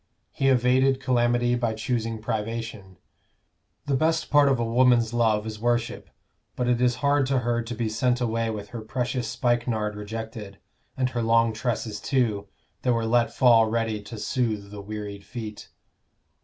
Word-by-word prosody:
He 135 - 0
evaded 130 +1 +3
calamity 120 -1 +2
by 120 -2 0
choosing 115 -1 -2
privation. 110 -3 -4 0.9
The 140 - +1
best 160 +3 +1
part 145 -1 +6
of 135 -3 +2
a 115 - 0
woman's 120 -1 +3
love 110 -3 +2
is 110 -1 -6
worship; 120 0 -1 0.5
but 125 - -1
it 125 0 +2
is 125 -1 +3
hard 140 -1 +3
to 135 0 +1
her 120 0 0
to 120 +1 -6
be 115 0 -1
sent 125 +3 +1
away 115 -1 0
with 105 -2 -5
her 115 +1 -6
precious 125 +1 -2
spikenard 115 -3 0
rejected, 105 -1 -7 0.4
and 130 -1 0
her 120 - -2
long 115 0 +3
tresses 110 -2 -3
too, 110 -7 0 0.3
that 125 - +2
were 115 -1 0
let 120 +1 +2
fall 115 -4 +5
ready 110 -2 -1
to 105 +3 -9
soothe 105 -2 -2
the 105 -1 -7
wearied 100 -1 -7
feet. 110 -3 -8
115 Hz, 165 wpm, -25 LUFS, 110-125 Hz, 0.9 s, part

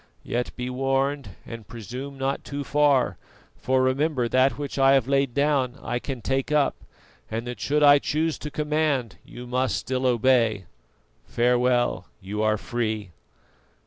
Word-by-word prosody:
Yet 120 +1 -2
be 125 0 -4
warned 135 -3 -1
and 115 -3 -9
presume 125 +5 -7
not 135 +1 -2
too 145 0 -5
far, 145 -3 +2 0.4
for 130 0 +1
remember 130 -1 +1
that 130 +3 +2
which 145 -1 -5
I 135 0 +6
have 135 -3 +3
laid 135 -2 +1
down 140 -3 +1
I 120 0 -3
can 130 -2 -6
take 135 +2 -1
up, 150 -1 +3 0.6
and 115 +2 -3
that 120 -3 -6
should 150 +7 +1
I 145 0 +8
choose 155 +2 -1
to 150 - -5
command, 150 - -1
you 125 - -10
must 125 +1 0
still 130 +1 -1
obey. 120 -5 +2 0.6
Farewell, 125 0 +1
you 105 +2 -4
are 110 0 +2
free." 110 -4 -3
130 Hz, 150 wpm, -25 LUFS, 120-140 Hz, 0.6 s, I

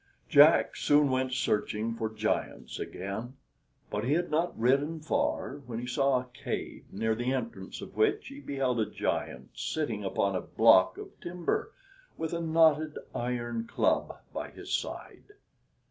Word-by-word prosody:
Jack - - +6
soon 145 -1 +4
went 130 0 0
searching 110 -2 0
for 110 -1 -2
giants 110 - -2
again, 100 +7 -5 0.6
but 105 - -1
he 130 +4 +1
had 175 +1 0
not 165 +3 0
ridden 140 +7 +2
far, 150 -2 -1
when 115 -2 -4
he 120 - -4
saw 135 +1 +2
a 125 - -8
cave, - - -5
near 110 +3 0
the 120 +3 -1
entrance 135 - -4
of - - -9
which 430 0 +1
he 275 +1 -9
beheld 135 - -1
a 105 -2 0
giant - - -3
sitting 120 -10 -2
upon 100 0 0
a 90 - 0
block 95 -5 +5
of - - -7
timber, 175 - -2 0.5
with 160 +1 -3
a 170 - -1
knotted 160 -2 +3 0.2
iron 120 -1 -2
club - - +1 0.2
by - - -4
his - - -7
side. 415 - -5
130 Hz, 155 wpm, -30 LUFS, 115-155 Hz, 0.6 s, Jack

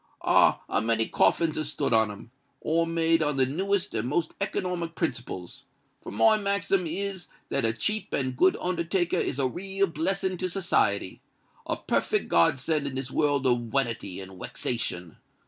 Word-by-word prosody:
Ah! - - +4
a - - 0
many 115 0 +1
coffins 165 -2 +2
has 155 -1 -1
stood 145 -4 -1
on 110 -1 +4
'em—all 140 +9 -4
made 165 0 +2
on 150 -2 0
the 130 - +4
newest 190 +8 -1
and 115 +2 -2
most 160 +2 -1
economic 180 -4 -2
principles; 115 - -4 0.4
for - - -8
my 115 - +4
maxim 200 -3 0
is 190 +2 -3 0.2
that 140 - +1
a 115 - +3
cheap 210 - -2
and 130 -2 -1
good 185 +8 +3
undertaker 175 0 0
is 135 - -2
a 135 - +1
real 195 +7 -1
blessin' 185 +3 -1
to 185 - -1
society—a 105 - -2
perfect - - 0
god 85 +9 +4
send 150 +1 -1
in 135 - -5
this 130 -1 -4
world 145 -3 +1
of 125 -1 +3
wanity 115 -8 -2
and 95 -1 -10
wexation. 90 -8 -3
150 Hz, 165 wpm, -27 LUFS, 120-180 Hz, 0.4 s, Ah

